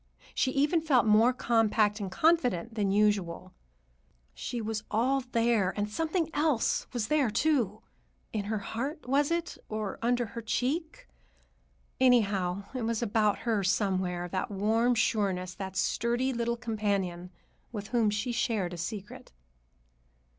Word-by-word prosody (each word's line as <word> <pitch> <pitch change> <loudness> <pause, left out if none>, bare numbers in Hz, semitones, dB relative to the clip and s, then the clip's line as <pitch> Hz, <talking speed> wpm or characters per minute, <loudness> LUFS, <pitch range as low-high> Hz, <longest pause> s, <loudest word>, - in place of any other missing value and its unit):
She 260 - +1
even 295 +4 +2
felt 280 -7 +3
more 220 +3 +5
compact 225 -3 +2
and 200 -2 -3
confident 245 - +2
than 205 -3 0
usual. 195 -3 +1 0.8
She 235 - -5
was 220 -1 -3
all 255 +5 +1
there, 230 -5 +2
and 205 0 0
something 325 - -1
else 295 -5 +1
was 235 -5 -2
there, 295 -5 +2
too,—in 220 -4 -2
her 215 +1 -1
heart, 255 - -5
was 280 +2 +2
it, 340 0 -2
or 215 -2 -4
under 240 +1 +1
her 230 +2 -7
cheek? 315 - -2 0.9
Anyhow, 200 -7 +3
it 255 - -3
was 230 0 -1
about 215 -2 +1
her 220 -4 +1
somewhere, 185 -2 0
that 185 +1 -2
warm 220 +5 +2
sureness, 195 -5 0
that 190 0 -6
sturdy 240 +6 0
little 235 0 -1
companion 200 -6 -2 0.4
with 205 -3 -6
whom 235 -4 +2
she 210 +4 -1
shared 220 -6 -1
a - - -6
secret. 200 +4 -6
225 Hz, 135 wpm, -29 LUFS, 200-245 Hz, 0.9 s, more